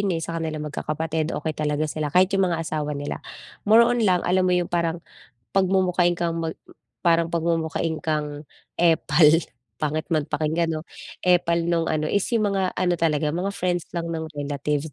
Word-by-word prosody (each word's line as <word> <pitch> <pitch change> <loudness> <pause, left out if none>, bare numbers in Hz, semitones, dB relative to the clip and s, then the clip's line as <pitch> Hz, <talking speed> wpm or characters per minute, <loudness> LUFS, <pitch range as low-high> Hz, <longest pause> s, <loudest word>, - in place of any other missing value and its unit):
'yun 200 - 0
eh 165 - -3
sa 165 0 -4
kanilang 155 -2 -3
magkakapatid 155 +1 -2
okey 160 - -2
talaga 150 0 -1
sila, 155 0 -2
kahit 185 +5 +3
'yung 195 -1 +3
mga 170 -2 -1
asawa 150 -2 -2
nila. 145 0 -4 0.5
More 225 +2 +8
on 245 0 +1
lang 180 -3 +2
alam 185 +1 +2
mo 180 - +2
'yung 175 -1 0
parang, 170 -1 0 0.5
pagmumukhain 185 -2 +2
kang 165 -1 -1
mag 160 -1 -3 0.5
parang 170 -1 +3
pagmumukhain 165 -1 0
kang 150 -1 -2 0.4
epal, 160 -2 +5 0.5
pangit 155 +1 -1
man 155 -2 +2
pakinggan 160 +2 0
'no, 155 - -4 0.4
epal 175 -2 +3
nung 170 -1 0
ano 155 -1 0
is 200 - +1
'yung 210 -2 +1
mga 190 -2 0
ano 180 -1 +1
talaga, 150 -2 +1
mga 185 +4 -2
friends 175 -1 -1
lang 170 0 -2
ng 160 -1 -4
relatives 145 +1 -2
165 Hz, 175 wpm, -24 LUFS, 155-175 Hz, 0.5 s, More